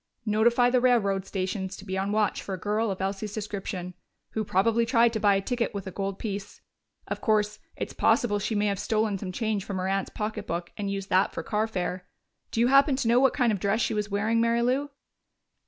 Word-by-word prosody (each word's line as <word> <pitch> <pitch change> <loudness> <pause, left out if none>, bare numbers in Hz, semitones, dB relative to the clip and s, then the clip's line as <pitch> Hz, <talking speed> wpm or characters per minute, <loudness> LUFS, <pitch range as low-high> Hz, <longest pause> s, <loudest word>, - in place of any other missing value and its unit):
"Notify 235 +3 +3
the 250 -1 +3
railroad 200 -6 +2
stations 190 0 -3
to 200 - -11
be 190 -1 -3
on 195 +1 -1
watch 210 -1 +1
for 195 - -4
a - - -10
girl 210 +4 0
of 190 -1 -3
Elsie's 195 +2 -3
description, 195 -4 -5 0.4
who 220 - -1
probably 220 +4 +2
tried 230 -1 +3
to 220 - -1
buy 205 -1 +4
a 195 - +1
ticket 235 +1 -2
with 200 - -4
a 190 - -5
gold 195 +1 -3
piece. 200 -2 -5 0.5
Of - - -4
course, 210 -2 +1 0.2
it's - - -5
possible 205 -4 +2
she 215 +2 -2
may 205 0 +2
have 200 -2 0
stolen 215 -2 0
some 185 -1 -5
change 215 0 -1
from 200 -1 -4
her 185 0 -1
aunt's 195 0 -1
pocketbook 210 -5 -4
and 205 -2 -3
used 195 -1 -4
that 185 +2 +3
for - - -4
carfare.... 190 -4 -2 0.4
Do - - -3
you 240 +1 +4
happen 275 +1 +5
to 260 -3 -1
know 235 +2 +5
what 270 0 +3
kind 240 -3 +3
of 205 - -1
dress 200 +4 +1
she 240 - 0
was 210 -1 -2
wearing, 215 +3 +1
Mary 235 0 +2
Lou?" 265 +4 +1
210 Hz, 220 wpm, -27 LUFS, 195-230 Hz, 0.5 s, happen